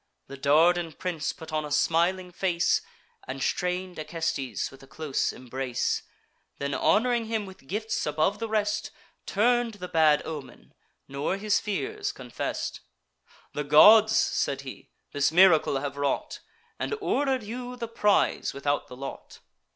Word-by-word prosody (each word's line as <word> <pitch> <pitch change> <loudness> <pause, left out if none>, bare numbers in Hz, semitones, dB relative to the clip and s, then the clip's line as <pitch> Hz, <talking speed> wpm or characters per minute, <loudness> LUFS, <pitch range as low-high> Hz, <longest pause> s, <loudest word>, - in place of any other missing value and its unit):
The 140 - -9
Dardan 160 +4 +3
prince 175 -3 -3
put 160 -1 -11
on 155 0 0
a 150 - -6
smiling 170 +5 +1
face, 175 -1 +1 0.5
And 130 +1 -5
strain'd 180 -1 -2
Acestes 155 -4 -3
with 135 - -15
a 135 - -15
close 145 0 -2
embrace; 130 0 -2 0.6
Then, 140 0 -3
hon'ring 235 - +2
him 220 -2 -2
with 190 -8 -14
gifts 215 +3 -2
above 155 +7 +1
the 225 -1 -3
rest, 210 -1 0 0.4
Turn'd 235 +2 +2
the 180 -3 -7
bad 155 -3 +4
omen, 150 -4 -8 0.3
nor 140 +7 -2
his 205 0 +1
fears 400 - -3
confess'd. - - -5 0.7
"The 150 - -2
gods," 210 +10 +7
said - - 0
he, - - -10 0.2
"this 145 0 +1
miracle 165 -5 +5
have 140 0 -4
wrought, 140 -1 -2 0.4
And - - -2
order'd 270 - 0
you 245 +3 -6
the 235 -2 -5
prize 210 -9 +1
without 145 +1 -1
the 125 -2 -11
lot. 135 +1 -8
175 Hz, 145 wpm, -27 LUFS, 145-215 Hz, 0.7 s, gods